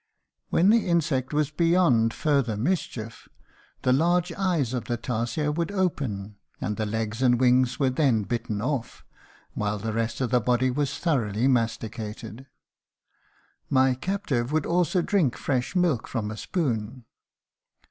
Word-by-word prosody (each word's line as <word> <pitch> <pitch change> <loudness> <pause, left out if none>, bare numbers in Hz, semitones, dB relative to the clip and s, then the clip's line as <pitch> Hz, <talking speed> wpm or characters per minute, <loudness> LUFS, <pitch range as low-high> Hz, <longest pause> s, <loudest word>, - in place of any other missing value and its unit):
"When 190 +5 +4
the 230 -3 +3
insect 150 -7 +1
was 150 -1 0
beyond 165 -9 +3
further 135 -6 0
mischief 115 - -3 0.5
the 125 - +3
large 175 +5 +2
eyes 170 - 0
of 125 - -3
the 120 -2 -2
tarsier 120 +5 -2
would 170 +5 -2
open 130 - -2 0.2
and 105 - -2
the 110 0 -2
legs 110 +2 -3
and 125 -2 +4
wings 125 0 +3
were 135 -2 +2
then 130 -6 +2
bitten 110 0 -3
off, 130 -3 -3 0.5
while 105 0 -1
the 110 +2 -4
rest 115 0 -2
of 125 -3 -1
the 125 -1 +3
body 125 +2 +2
was 145 +2 -1
thoroughly 120 - 0
masticated. 115 0 -2 1.2
My 130 -1 +4
captive 140 - -2
would 155 -1 +1
also 175 +1 +1
drink 165 - +1
fresh 130 +5 -2
milk 170 -10 +1
from 110 -4 -3
a 110 - -7
spoon. 120 - -2
130 Hz, 145 wpm, -26 LUFS, 115-155 Hz, 1.2 s, When